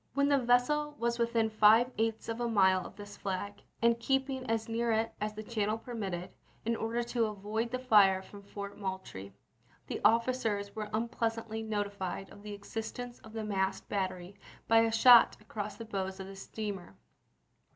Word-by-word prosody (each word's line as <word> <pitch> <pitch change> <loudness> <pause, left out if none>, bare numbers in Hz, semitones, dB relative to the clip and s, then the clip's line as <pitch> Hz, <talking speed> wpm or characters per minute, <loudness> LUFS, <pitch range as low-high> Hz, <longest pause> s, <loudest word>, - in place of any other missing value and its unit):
When 280 0 +3
the 280 -1 +4
vessel 265 +5 +2
was 235 0 -1
within 230 -1 +1
five 220 +3 +5
eighths 225 0 -1
of 230 +1 -3
a 240 - +1
mile 190 -4 +4
of - - -15
this 205 0 -10
flag, 200 +1 -4 0.2
and 235 0 +4
keep 270 +3 +1
ing 260 -3 -5
as 225 -1 0
near 230 +1 0
it 225 +1 0
as 210 0 -2
the 215 - -6
channel 215 -1 -1
permitted, 200 -7 -5 0.3
in 230 +1 +1
order 230 +2 -1
to 235 -1 0
avoid 215 +3 -3
the 255 - -2
fire 205 -7 +5
from 200 +1 -12
Fort 200 0 -8
Moultrie, 190 - -5 0.5
the - - -5
officers 225 -4 +2
were 215 -1 -4
unpleasantly 225 0 -2
notified 200 -3 -3
of 200 - -13
the 210 0 -7
existence 225 +4 -6
of 220 -1 -14
the 220 -1 -3
masked 195 -2 -1
battery 185 -1 -3 0.3
by 225 0 +6
a 225 0 +3
shot 235 +1 +7
across 210 -1 -6
the 230 - -8
bows 190 -2 -4
of 190 - -5
the 195 +1 -9
steamer. 195 - -6
220 Hz, 180 wpm, -32 LUFS, 200-235 Hz, 0.5 s, shot